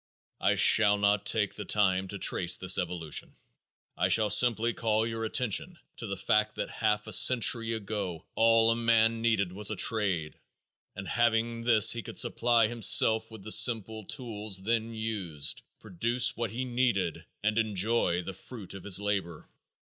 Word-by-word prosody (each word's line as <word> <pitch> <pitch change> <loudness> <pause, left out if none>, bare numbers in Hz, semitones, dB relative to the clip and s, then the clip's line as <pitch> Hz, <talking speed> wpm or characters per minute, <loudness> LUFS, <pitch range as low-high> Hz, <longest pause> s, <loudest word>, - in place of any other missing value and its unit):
I - - +1
shall 105 -2 +4
not 105 0 0
take 105 -2 0
the 105 - -7
time 95 -3 0
to 100 - -7
trace 90 -2 +2
this 95 0 +3
evolution. 85 -3 -5 0.6
I - - -1
shall 105 -2 +2
simply 115 +1 +3
call 110 -1 -1
your 115 0 -5
attention 140 - -1 0.2
to 115 - -6
the 100 -1 -5
fact 105 +3 0
that - - -5
half 105 0 -1
a 110 - -3
century 115 -1 +3
ago 100 -6 -6
all 115 0 +3
a - - 0
man 115 -1 +1
needed 110 -5 0
was 105 +2 -2
a - - -4
trade 95 -8 -1 0.6
and 95 -1 -8
having 115 +1 0
this 115 -3 +5
he 120 - -3
could - - -11
supply 120 -2 +2
himself 110 -1 +3
with 110 -3 -13
the 110 - -8
simple 110 -2 +3
tools 105 -5 -2
then 115 +1 -2
used, 105 -9 -3 0.2
produce 115 +7 0
what 115 -1 -3
he 125 +5 -5
needed 120 -9 -2 0.2
and 110 +1 0
enjoy 105 -4 -1
the 95 - -7
fruit 105 0 -10
of 95 - -11
his 100 -2 +1
labor. 100 -6 -4
110 Hz, 165 wpm, -28 LUFS, 100-115 Hz, 0.6 s, this